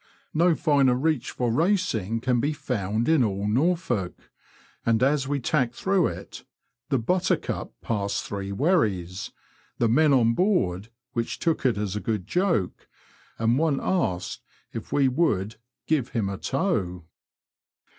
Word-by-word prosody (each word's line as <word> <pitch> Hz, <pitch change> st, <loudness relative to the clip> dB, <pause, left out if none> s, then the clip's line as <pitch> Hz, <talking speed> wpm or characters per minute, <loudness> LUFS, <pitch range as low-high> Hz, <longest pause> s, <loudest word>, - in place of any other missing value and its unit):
No 170 Hz, +1 st, +4 dB
finer 140 Hz, -6 st, +3 dB
reach 145 Hz, -1 st, 0 dB
for 120 Hz, -2 st, -1 dB
racing 115 Hz, -, +1 dB
can 125 Hz, 0 st, +1 dB
be 145 Hz, +6 st, 0 dB
found 115 Hz, -6 st, -2 dB
in 160 Hz, -5 st, +4 dB
all 100 Hz, -2 st, -1 dB
Norfolk, 125 Hz, -, -1 dB, 0.5 s
and 115 Hz, +1 st, +2 dB
as 135 Hz, 0 st, +2 dB
we 145 Hz, 0 st, 0 dB
tacked 125 Hz, -2 st, 0 dB
through 190 Hz, +1 st, +2 dB
it, -, -, -8 dB, 0.5 s
the 135 Hz, -, +2 dB
Buttercup 180 Hz, +10 st, -1 dB
passed 100 Hz, -3 st, -1 dB
three 100 Hz, -1 st, -5 dB
wherries, 100 Hz, -, 0 dB, 0.5 s
the 120 Hz, -, +2 dB
men 150 Hz, +7 st, +4 dB
on 115 Hz, -4 st, +4 dB
board 115 Hz, -, +1 dB, 0.2 s
which 115 Hz, -1 st, -2 dB
took 165 Hz, -5 st, +1 dB
it 120 Hz, -, +1 dB
as 105 Hz, -2 st, -2 dB
a -, -, -1 dB
good 105 Hz, -4 st, -2 dB
joke, 170 Hz, -, 0 dB, 0.5 s
and 115 Hz, +3 st, +2 dB
one 155 Hz, -4 st, +1 dB
asked 95 Hz, -, -1 dB, 0.3 s
if -, -, -7 dB
we 140 Hz, -2 st, +3 dB
would 120 Hz, -, 0 dB
" 125 Hz, -, -64 dB
give 145 Hz, -6 st, +1 dB
him 110 Hz, -5 st, -1 dB
a 100 Hz, -, -4 dB
tow." 100 Hz, -, -1 dB
125 Hz, 145 wpm, -25 LUFS, 105-155 Hz, 0.5 s, No